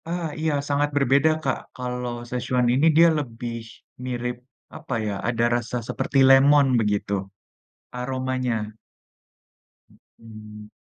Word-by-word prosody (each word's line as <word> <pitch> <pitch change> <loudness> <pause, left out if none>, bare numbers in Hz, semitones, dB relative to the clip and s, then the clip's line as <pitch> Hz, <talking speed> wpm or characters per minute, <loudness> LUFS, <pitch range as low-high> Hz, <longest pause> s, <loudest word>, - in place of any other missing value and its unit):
Ah, 170 0 -2
iya, 160 0 0 0.2
sangat 145 +1 +1
berbeda, 140 +2 +3
Kak. 135 - 0 0.2
Kalau, 125 -1 -4 0.2
szechuan 125 0 0
ini 135 +5 +2
dia 170 +1 +8
lebih 120 -3 -6 0.5
mirip 125 -1 -3 0.4
apa - - -7
ya, 105 - -2
ada 115 0 0
rasa 120 0 -3
seperti 140 - -2
lemon 140 +1 +6
begitu, 105 -2 -1 0.8
aromanya. 125 -4 -3 1.4
Mhm. 105 -1 -12
125 Hz, 110 wpm, -24 LUFS, 115-135 Hz, 1.4 s, dia